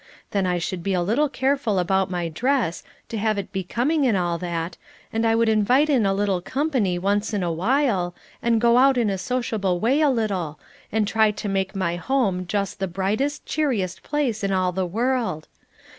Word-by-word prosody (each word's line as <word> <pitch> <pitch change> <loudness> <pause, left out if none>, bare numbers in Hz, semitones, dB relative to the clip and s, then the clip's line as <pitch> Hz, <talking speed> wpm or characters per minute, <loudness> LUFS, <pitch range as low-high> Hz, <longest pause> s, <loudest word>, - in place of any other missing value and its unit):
Then 195 -2 +1
I 180 -1 +1
should 175 +1 -3
be 195 +2 -1
a 180 - +1
little 240 +11 +1
careful 265 -5 0
about 190 +1 +1
my 175 -2 -2
dress, 230 - 0 0.3
to 225 - -3
have 215 0 +1
it 200 - -5
becoming 250 - 0
and 220 -5 +2
all 175 -2 -1
that, 170 -1 -3 0.4
and 225 +1 +1
I 225 - +3
would 230 0 +2
invite 245 +8 +3
in 240 -8 +3
a 195 - +2
little 195 -3 0
company 255 - 0
once 205 +4 0
in 195 - 0
a 170 - 0
while, 190 - +1 0.3
and 235 -1 +2
go 235 +1 +4
out 270 0 +5
in 225 -4 +2
a 190 - -2
sociable 205 -5 -1
way 260 - +2
a 300 - +4
little, 195 - -1 0.3
and 215 -1 +1
try 220 0 +3
to 210 0 -4
make 195 0 -1
my 175 -3 -1
home 190 -5 0
just 200 +1 -2
the 195 - -1
brightest, 200 +11 -1
cheeriest 245 - -1
place 255 -8 -1
in 195 - 0
all 185 -1 +1
the 185 0 -1
world. 230 -5 -1
205 Hz, 200 wpm, -23 LUFS, 185-245 Hz, 0.4 s, out